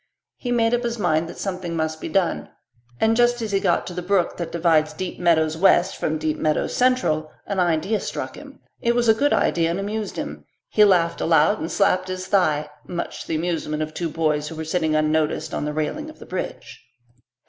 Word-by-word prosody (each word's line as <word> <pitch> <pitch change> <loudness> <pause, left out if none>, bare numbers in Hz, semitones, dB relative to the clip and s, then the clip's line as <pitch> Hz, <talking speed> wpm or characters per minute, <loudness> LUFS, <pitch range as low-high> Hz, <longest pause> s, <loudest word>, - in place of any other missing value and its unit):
He 245 - -4
made 230 -1 +2
up 240 - +2
his 235 0 -2
mind 160 -5 +1
that - - -9
something 180 -3 -4
must 160 -1 -2
be - - -4
done, 180 0 0 0.5
and 220 +1 +3
just 240 0 +3
as 220 -3 -3
he 195 - +2
got - - +1
to 180 - -6
the 180 - -4
brook 180 0 +1
that 170 -2 -4
divides 160 -2 +2
Deep 185 -1 -5
Meadows 160 -3 +3
West 190 +2 +4
from 155 - -1
Deep 155 0 -1
Meadows 155 -1 0
Central 200 -12 +1
an 200 -2 -2
idea 175 +5 +1
struck - - -5
him; - - -13 0.2
it 235 -1 +2
was 240 -1 +2
a 220 - +7
good 285 +6 +1
idea 165 -1 +2
and 170 +3 -1
amused 210 +1 -3
him. - - -5 0.3
He 210 - +5
laughed 170 -4 +2
aloud 165 +5 +3
and 165 - -4
slapped 185 -2 +2
his 185 0 -4
thigh, 155 -7 +2 0.2
much 175 -1 -4
to - - -9
the - - -1
amusement 155 -2 -1
of 155 0 -7
two 170 0 -2
boys 150 -1 0
who 160 - -7
were 160 0 -5
sitting 160 -1 0
unnoticed 155 0 0
on - - -2
the 150 - -2
railing 155 - -3
of 310 - -13
the - - -12
bridge. - - -6
175 Hz, 215 wpm, -23 LUFS, 155-205 Hz, 0.5 s, a